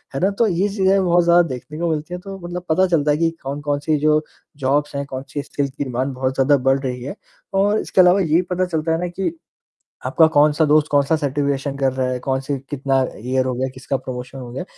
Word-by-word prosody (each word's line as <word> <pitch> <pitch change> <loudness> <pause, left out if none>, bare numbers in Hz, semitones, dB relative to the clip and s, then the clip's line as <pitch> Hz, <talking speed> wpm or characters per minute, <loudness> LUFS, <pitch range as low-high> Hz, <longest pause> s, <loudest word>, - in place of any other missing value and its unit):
है - - -1
ना? 195 - +3
तो 225 +3 +1
ये 190 +1 +1
चीज़ें 195 -1 +2
बहुत 175 0 +4
ज़्यादा 170 +1 +5
देखने 135 +3 -7
को 170 -1 0
मिलती 155 +2 -3
हैं 180 - -4
तो 195 0 -8
मतलब 175 0 -5
पता 185 +4 +3
चलता 150 -4 +2
है 145 - +2
कि 165 0 +2
कौन-कौन-सी 145 +2 -1
जो 155 +1 +3 0.4
जॉब्स 145 +1 +1
हैं 140 0 -2
कौन-सी 140 +2 -6
स्किल्स 140 -1 -2
की 145 +1 -4
डिमाँड 130 +1 -2
बहुत 130 +1 -1
ज़्यादा 140 +2 +4
बढ़ 135 +1 +3
रही 125 -2 -4
है। 145 +9 -6 0.4
और 205 +2 +2
इसके 185 - +3
अलावा 180 +2 +5
यही 165 +1 +3
पता 185 +1 +1
चलता 165 -2 -2
है 165 - +1
ना 180 - -2
कि 190 - -2 0.7
आपका 160 - +4
कौन-सा 150 0 +3
दोस्त 150 +1 +4
कौन-सा 145 +2 +3
सर्टिफिकेशन 140 -1 -1
कर 135 -1 +1
रहा 130 -1 -1
है, 125 -1 -2
कौन-से 135 +2 -2
कितना 135 -2 0 0.2
ईयर 130 +3 -1
हो 130 - -1
गया, 130 +1 -1
किसका 130 +1 -3
प्रमोशन 130 +1 -7
हो 125 -2 -8
गया? 135 - -4
145 Hz, 225 wpm, -20 LUFS, 135-170 Hz, 0.7 s, ज़्यादा